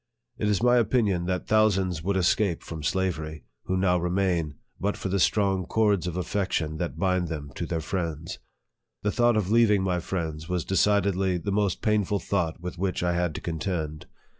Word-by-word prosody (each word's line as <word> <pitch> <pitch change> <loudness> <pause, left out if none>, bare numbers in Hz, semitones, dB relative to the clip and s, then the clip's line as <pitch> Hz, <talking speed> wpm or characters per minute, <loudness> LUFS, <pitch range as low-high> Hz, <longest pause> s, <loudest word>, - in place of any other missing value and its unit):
It 105 - 0
is 105 +1 +1
my 125 0 +5
opinion 105 -6 +2
that 90 0 -1
thousands 95 -6 +2
would 95 +3 0
escape 95 0 +1
from 80 -2 -7
slavery, 80 -3 -2 0.2
who 95 - 0
now 90 -1 +2
remain, 90 -4 0 0.2
but 100 +1 -1
for 95 - -4
the 100 +1 0
strong 95 -3 +2
cords 105 -5 +2
of 90 0 -3
affection 90 -4 -1
that 80 -4 -3
bind 90 0 +1
them 75 -3 -5
to 85 - -3
thejr 80 -2 -2
friends. 85 -2 -3 0.6
The 105 - +1
thought 120 -1 +3
of 100 -2 0
leaving 110 -4 +4
my 90 -2 0
friends 80 -3 -4
was 90 -2 -1
decidedly 95 -1 +2
the 100 +4 -3
most 100 -3 0
painful 105 -2 +2
thought 90 -5 -1
with 90 0 -7
which 95 -2 -1
I 90 0 +1
had 85 -2 -1
to - - -5
contend. 80 -2 -3
90 Hz, 185 wpm, -26 LUFS, 85-100 Hz, 0.6 s, my